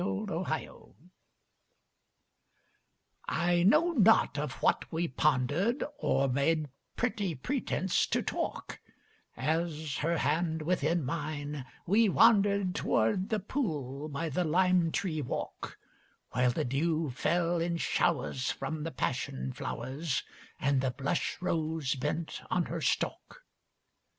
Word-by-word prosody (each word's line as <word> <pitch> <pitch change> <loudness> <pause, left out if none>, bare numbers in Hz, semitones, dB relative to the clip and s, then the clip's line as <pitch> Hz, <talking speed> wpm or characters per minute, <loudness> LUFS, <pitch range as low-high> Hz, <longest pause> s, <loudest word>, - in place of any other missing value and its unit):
6 185 - -1
Autoplay 175 - -4 2.3
I 175 0 +2
KNOW 305 - +5
not 220 - +5
of 150 -3 -2
what - - 0
we 170 +1 0
ponderŌĆÖd 155 - +1 0.2
Or 140 - +2
made 145 +3 +1 0.3
pretty 210 -8 -1
pretence 190 - 0
to - - 0
talk, - - -4 0.6
As, 160 -3 -1
her 165 +3 0
hand 160 +1 0
within 170 -1 +1
mine, 145 -1 -4 0.2
we 210 +4 +4
wanderŌĆÖd 200 -3 +4
TowŌĆÖrd 115 - +1
the 215 - +1
pool 155 - -3
by 155 +3 -3
the 160 +4 0
lime 175 0 +3
tree 155 -5 -1
walk, 130 - -5 0.5
While 125 0 +2
the 120 - -1
dew 155 +3 0
fell 170 +6 +1
in 170 0 0
showers 155 -6 0
from 155 -1 -3
the 165 - -3
passion 65 - -2
flowers 140 +2 -3 0.4
And 135 -1 +2
the 130 - +1
blush 140 +6 -2
rose 160 -5 0
bent 150 +4 -3
on - - +1
her - - -4
stalk. - - -2
160 Hz, 120 wpm, -31 LUFS, 140-180 Hz, 2.3 s, KNOW